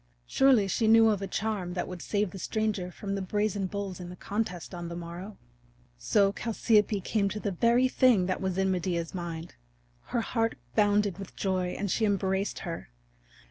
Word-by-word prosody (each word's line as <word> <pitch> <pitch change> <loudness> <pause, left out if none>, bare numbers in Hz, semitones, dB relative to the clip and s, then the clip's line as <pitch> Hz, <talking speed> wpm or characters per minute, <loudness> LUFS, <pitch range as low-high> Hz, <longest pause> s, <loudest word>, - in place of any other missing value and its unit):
Surely 255 - +4
she 220 +3 +1
knew 225 0 +7
of 205 -2 0
a 195 - -3
charm 200 -5 -2
that 180 - -2
would 180 -2 -7
save 205 -3 -1
the 195 - -8
stranger 210 -2 -1
from 195 +2 -5
the 195 - -2
brazen 205 0 -1
bulls 200 -1 -5
in 175 -1 -7
the 180 - -8
contest 185 -3 -4
on 175 -1 -5
the 170 - -6
morrow! 175 +4 -7 0.6
So 195 - +3
Chalciope 215 -2 +2
came 200 -1 +1
to 210 - -4
the 205 - -2
very 235 +7 +3
thing 250 -7 +4
that 185 0 -2
was 190 -1 -1
in 190 0 +2
Medea's 175 -2 -1
mind. 170 -2 -5 0.5
Her 235 - -1
heart 225 0 -1 0.2
bounded 205 -2 +2
with 195 - -9
joy 185 -2 -1
and 200 -2 -2
she 225 - +2
embraced 195 -1 0
her. 165 -1 -5
195 Hz, 185 wpm, -29 LUFS, 180-215 Hz, 0.6 s, knew